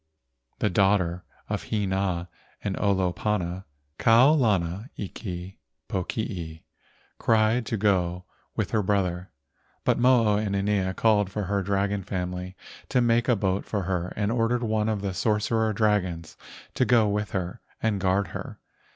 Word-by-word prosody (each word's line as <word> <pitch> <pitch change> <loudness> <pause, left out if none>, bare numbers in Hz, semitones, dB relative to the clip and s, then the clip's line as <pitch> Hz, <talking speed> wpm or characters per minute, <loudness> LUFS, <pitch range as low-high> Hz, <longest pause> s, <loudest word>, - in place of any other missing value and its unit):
The - - +1
daughter 90 -2 +2 0.2
of - - -4
Hina 95 -4 -1 0.4
and - - -1
Olopana, 95 -1 0 0.3
Kau 115 +5 +6
lana 105 - +1
iki 95 -1 -6 0.3
pokii, 90 -4 -4 0.6
cried 110 +1 +2
to 115 - -1
go 90 -3 +1 0.3
with - - -1
her 110 - +2
brother, 95 -3 0 0.5
but - - +2
Mo 125 -2 +5
o 105 -1 +3
inanea 100 -2 0
called 105 -3 +3
for 105 +1 -3
her 100 +1 0
dragon 100 +1 0
family 90 -1 -4 0.3
to - - +2
make 120 0 +2
a 120 - +5
boat 95 -1 0
for 100 -3 -2
her 90 -1 -2
and 105 +1 0
ordered 120 +1 +1
one 110 -1 0
of 105 -2 -2
the 95 -2 -2
sorcerer 110 +3 +1
dragons 100 -6 0 0.4
to - - +2
go 115 -3 +4
with 105 0 -1
her 90 -2 -3 0.2
and 105 -3 0
guard 95 +1 +1
her. - - -7
100 Hz, 140 wpm, -26 LUFS, 90-110 Hz, 0.6 s, Kau